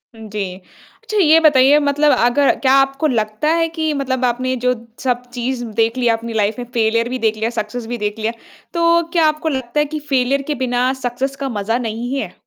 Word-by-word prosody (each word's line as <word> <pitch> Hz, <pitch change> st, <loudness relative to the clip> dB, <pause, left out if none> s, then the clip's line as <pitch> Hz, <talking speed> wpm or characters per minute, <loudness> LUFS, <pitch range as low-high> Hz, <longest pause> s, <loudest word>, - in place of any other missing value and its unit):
उम, 220 Hz, -1 st, -10 dB
जी। 195 Hz, -3 st, -4 dB, 0.5 s
अच्छा 430 Hz, -, -3 dB
ये 325 Hz, -4 st, +6 dB
बताइए 290 Hz, -2 st, +5 dB
मतलब 290 Hz, +1 st, +2 dB
अगर 245 Hz, +4 st, +3 dB
क्या 265 Hz, -1 st, +3 dB
आपको 275 Hz, +3 st, +2 dB
लगता 215 Hz, +2 st, -1 dB
है 330 Hz, 0 st, +2 dB
कि 315 Hz, -1 st, 0 dB
मतलब 260 Hz, -2 st, -1 dB
आपने 255 Hz, +2 st, 0 dB
जो 250 Hz, 0 st, +3 dB, 0.3 s
सब 250 Hz, -1 st, 0 dB
चीज़ 245 Hz, 0 st, -3 dB, 0.2 s
देख 230 Hz, +3 st, +1 dB
लिया 240 Hz, -2 st, +2 dB
अपनी 230 Hz, 0 st, -7 dB
लाइफ 215 Hz, +2 st, 0 dB
में, 245 Hz, -, -4 dB
फेलियर 230 Hz, +1 st, +1 dB
भी 255 Hz, 0 st, -3 dB
देख 220 Hz, -1 st, 0 dB
लिया, 220 Hz, +1 st, -1 dB
सक्सेस 225 Hz, +2 st, -5 dB
भी 240 Hz, 0 st, -3 dB
देख 210 Hz, +1 st, -3 dB
लिया, 220 Hz, +1 st, -1 dB, 0.4 s
तो 335 Hz, 0 st, +3 dB
क्या 330 Hz, -2 st, +4 dB
आपको 310 Hz, +1 st, -1 dB
लगता 260 Hz, 0 st, -2 dB
है 295 Hz, -, +3 dB
कि 305 Hz, -, -2 dB
फेलियर 270 Hz, +1 st, +2 dB
के -, -, 0 dB
बिना 250 Hz, +1 st, +1 dB
सक्सेस 260 Hz, +3 st, -2 dB
का 275 Hz, -1 st, -4 dB
मज़ा 225 Hz, +4 st, 0 dB
नहीं 235 Hz, +4 st, -4 dB
है? 210 Hz, -9 st, -4 dB
255 Hz, 210 wpm, -18 LUFS, 230-285 Hz, 0.5 s, ये